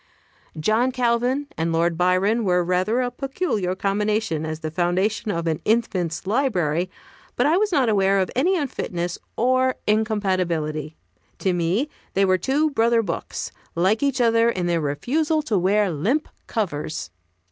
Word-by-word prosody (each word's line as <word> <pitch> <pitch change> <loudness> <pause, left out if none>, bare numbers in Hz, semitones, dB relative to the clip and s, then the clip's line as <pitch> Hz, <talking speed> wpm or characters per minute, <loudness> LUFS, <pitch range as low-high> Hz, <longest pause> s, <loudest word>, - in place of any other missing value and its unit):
John 220 +10 +2
Calvin 250 +2 +1
and 165 +1 0
Lord 165 +1 +1
Byron 185 +6 +2
were 180 -2 +2
rather 185 +7 +1
a 245 -1 -1
peculiar 245 - -2
combination, 200 -5 -1
as 155 0 -5
the 155 - -4
foundation 185 +6 0
of 170 -4 -1
an 160 -2 -1
infant's 185 -7 0
library; 185 - 0 0.5
but - - +2
I 305 +3 +4
was 420 +1 +1
not 270 -7 +3
aware 195 -2 +3
of 190 -1 0
any 355 +9 +2
unfitness 180 - -3 0.2
or 255 +2 +2
incompatibility. 185 -8 0 0.4
To 190 - 0
me 175 - 0 0.3
they 195 +1 +4
were 185 -1 +2
two 295 - +1
brother 230 -2 +3
books, 170 -5 -4 0.2
like 190 +6 +2
each 280 -2 +1
other 230 -1 +4
in 185 -6 -1
their 170 -1 +1
refusal 300 - 0
to 215 -9 +1
wear 200 +2 +2
limp 220 - 0 0.2
covers. 155 - -3
200 Hz, 150 wpm, -23 LUFS, 175-245 Hz, 0.5 s, I